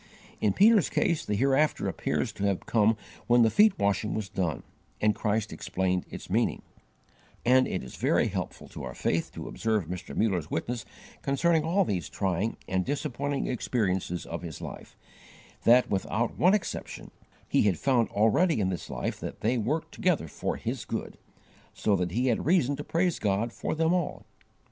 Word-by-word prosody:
In 105 -2 +2
Peter's 210 -3 +5
case 175 -8 +1
the 105 - -1
hereafter 135 +6 +2
appears - - -1
to - - -6
have 100 -2 0
come 110 -1 +3 0.3
when 120 0 +6
the 110 - +4
feet 210 -1 +5
washing 100 +1 0
was 105 -3 -3
done 85 -7 -2 0.4
and 105 0 +3
Christ 105 0 -1
explained 90 -1 -1
its - - -8
meaning; - - 0 0.8
and 130 +2 +5
it 95 - -3
is 65 - -9
very - - +2
helpful - - -5
to - - -8
our - - -6
faith 85 - -1
to - - -7
observe 110 -5 -1
Mr. 85 -4 -6
Muller's 90 -8 +1
witness 115 +6 -3 0.4
concerning 160 +3 +2
all 180 +5 +2
these 90 - -2
trying 95 +3 -1
and 95 0 0
disappointing 140 - -2
experiences 95 -8 -1
of 85 - -5
his 85 -3 -7
life, - - -9 0.7
that, 125 +2 +5
without 110 +4 -1
one 185 +5 +5
exception, 205 - -5 0.4
he - - +3
had 95 -5 +2
found 125 - +2
already 115 - +3
in 95 -2 +1
this 90 - -5
life - - -3
that - - -7
they 115 +4 +2
worked 155 +8 -1
together 175 - +1
for - - -3
his - - -4
good; - - -5 0.6
so 105 - +2
that 90 -2 0
he 120 +9 0
had 125 +1 +1
reason 150 -6 +3
to 145 - -6
praise 175 +2 0
God 105 +3 0
for - - -3
them 160 +2 +2
all. 180 -4 -2
115 Hz, 175 wpm, -28 LUFS, 95-145 Hz, 0.8 s, when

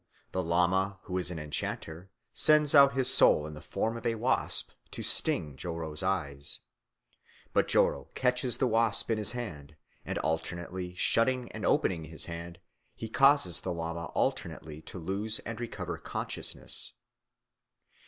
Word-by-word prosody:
The 95 - -1
lama, 90 +3 +1
who 90 0 -2
is 90 - +1
an 90 - -5
enchanter, 80 +3 -5 0.2
sends 150 -1 +5
out 140 -2 +8
his 130 -2 +3
soul 75 - +5
in 75 - -7
the 75 - -9
form 110 +7 -2
of 115 - -7
a 115 - +1
wasp 120 +4 +1 0.2
to - - -5
sting 75 -3 +3
Joro's 80 0 -5
eyes. 75 -7 -2 0.9
But - - +3
Joro - - +2
catches 125 -1 +1
the - - +2
wasp 115 -1 +2
in 110 - +1
his 105 - +1
hand, 80 -12 -7 0.3
and - - -4
by - - -1
alternately 85 +3 -3
shutting 125 +6 +1
and - - -3
opening 85 -4 +1
his 80 -2 -4
hand 85 0 -7 0.4
he 115 - -6
causes 135 - +4
the 95 - -3
lama 85 0 -4
alternately 75 0 -2
to 90 - -9
lose 100 +6 0
and 115 +1 -5
recover 120 - -5
consciousness. - - -4
90 Hz, 155 wpm, -30 LUFS, 80-115 Hz, 0.9 s, out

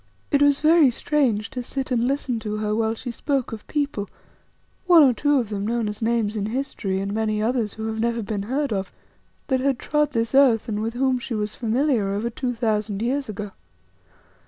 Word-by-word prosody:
It 285 -2 +3
was 285 -1 +4
very 315 -2 +6
strange 240 -4 0
to 250 - -4
sit 265 +2 -4
and 240 -1 +2
listen 265 -3 -1
to 215 -1 -4
her 210 0 -1
while 225 0 0
she 245 +2 -6
spoke 270 +2 -2
of 220 -2 -8
people, 280 -9 -2 0.8
one 345 -4 +8
or 260 -3 +5
two 290 +4 +2
of 235 -5 -1
them 205 -1 -3
known 230 -1 0
as 210 +1 -5
names 225 -2 0
in 205 -1 -2
history 220 -6 -2
and 200 +1 -3
many 215 -1 0
others 225 -1 0
who 220 - -5
never 235 +1 +1
have 230 -3 -3
been 205 -1 -3
heard 275 -1 0
of, 190 -2 -3 0.5
that 260 -2 +1
had 270 -1 +1
trod 300 +2 0
this 230 +1 -1
earth 265 -5 +5
and 210 -2 -2
with 225 +2 -3
whom 260 0 +1
she 235 -1 -4
was 210 0 -2
familiar 235 -2 +1
over 220 +4 -2
two 245 +1 -3
thousand 215 -2 -1
years 270 +1 -1
ago. 205 -1 -5
230 Hz, 205 wpm, -23 LUFS, 215-270 Hz, 0.8 s, one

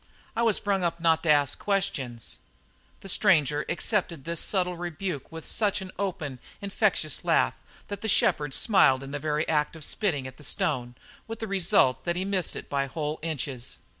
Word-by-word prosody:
I - - 0
was 225 -3 +3
brung 195 -2 0
up 170 0 -1
not 165 -1 +3
to 165 - -2
ask 145 -2 +3
questions." 140 - -2 0.6
The - - -9
stranger 155 -7 +3
accepted 175 - -1
this 170 -1 -2
subtle 180 -3 +1
rebuke 175 -3 -4
with 165 -1 -8
such 210 -3 +1
an 190 -1 -7
open, 160 -9 -3 0.2
infectious 200 -1 0
laugh - - +3 0.3
that 205 -1 -5
the 220 - -2
shepherd 150 -8 +2
smiled 135 - +4
in 135 - -8
the 145 - -3
very 150 +1 -1
act 150 0 +1
of 155 -3 -6
spitting 165 - 0
at 130 0 -8
the - - -13
stone, 125 -5 -1 0.3
with 225 0 -5
the 225 - -4
result 175 -9 +3
that 175 -1 0
he 185 +1 -1
missed 195 -3 0
it - - -7
by 140 -1 -1
whole 150 +2 -3
inches. 140 -6 -4
165 Hz, 185 wpm, -27 LUFS, 145-195 Hz, 0.6 s, smiled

